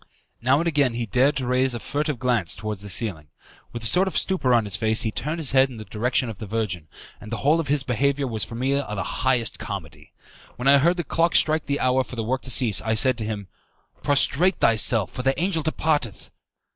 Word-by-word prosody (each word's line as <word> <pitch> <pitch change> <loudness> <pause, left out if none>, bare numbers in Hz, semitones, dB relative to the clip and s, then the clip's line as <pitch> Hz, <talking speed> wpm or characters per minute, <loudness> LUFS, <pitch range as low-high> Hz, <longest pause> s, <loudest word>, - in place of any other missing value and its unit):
Now 130 +3 +3
and 165 - -1
again 145 -7 +2
he 120 0 -2
dared 130 +8 +2
to 130 -1 -3
raise 125 0 +1
a - - -4
furtive 150 +3 -3
glance 120 -8 0
towards 105 -2 -5
the 100 - -6
ceiling. 90 -5 -1 0.4
With 120 -1 -7
a - - -3
sort 180 +11 +3
of 190 - -2
stupor 180 -10 +1
on 120 -3 +3
his 100 -2 -3
face, 110 +1 +1
he 110 - -1
turned 150 +9 -4
his 155 -5 0
head 135 0 +4
in 125 - -10
the 110 - -9
direction 125 +4 -1
of 110 -4 -8
the 110 - -7
Virgin, 95 -7 -3 0.3
and 105 - -11
the 115 - -2
whole 155 +3 +4
of 165 - -3
his 145 -1 +1
behaviour 140 +3 0
was 110 -5 -2
for 115 - -7
me 130 +3 -1
the 105 -8 -2
highest 125 -3 0
comedy. 100 -8 -8 0.4
When 125 - -3
I 140 0 +7
heard 170 +5 +2
the 175 - -2
clock 165 +2 0
strike 155 0 +3
the 140 0 -1
hour 130 +1 +2
for 125 - -10
the 115 - -3
work 130 +4 -2
to - - -6
cease, 120 -5 +4
I 110 +1 -1
said 130 +3 +3
to 110 - -3
him, 105 -3 -5 0.5
"Prostrate 150 +6 +2
thyself, 110 -2 +2
for 125 - -5
the 135 +1 0
angel 175 -2 0
departeth." 150 - -2
125 Hz, 235 wpm, -23 LUFS, 110-140 Hz, 0.5 s, I